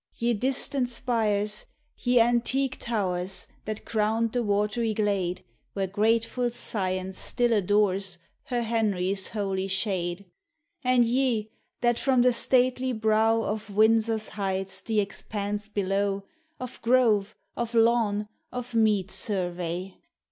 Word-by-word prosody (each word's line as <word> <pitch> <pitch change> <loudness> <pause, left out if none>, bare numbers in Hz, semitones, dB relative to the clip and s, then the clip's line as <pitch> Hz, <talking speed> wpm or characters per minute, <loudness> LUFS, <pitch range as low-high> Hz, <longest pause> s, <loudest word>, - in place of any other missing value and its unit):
Ye 235 +1 +1
distant 255 +2 0
spires, 215 -4 -1 0.3
ye 245 -1 +2
antique 245 +3 +2
towers, 190 -5 -2 0.2
That 215 0 -5
crowned 220 +1 +1
the 245 - 0
watery 210 +1 0
glade, 195 -4 0 0.3
Where 195 -1 -1
grateful 225 +5 +1
Science 190 -5 -3
still 240 -1 0
adores 195 -2 +1 0.3
Her 240 -2 -1
Henry's 200 -4 0
holy 195 -2 -2
shade; 190 -1 -1 0.6
And 250 -1 +4
ye 235 -3 0 0.3
that 240 -1 +2
froin 260 -3 +3
the 250 0 +4
stately 255 +1 +2
brow 220 0 +2
Of 215 0 -3
Windsor's 220 +1 +3
heights 195 -1 -2
the 220 -2 0
expanse 205 +1 -3
below 200 0 0 0.4
Of 255 0 -7
grove, 225 -4 +3 0.2
of 235 0 -3
lawn, 225 -3 +3 0.2
of 250 -1 -6
mead 210 -4 +2
survey. 180 -2 -2
215 Hz, 120 wpm, -27 LUFS, 195-235 Hz, 0.6 s, And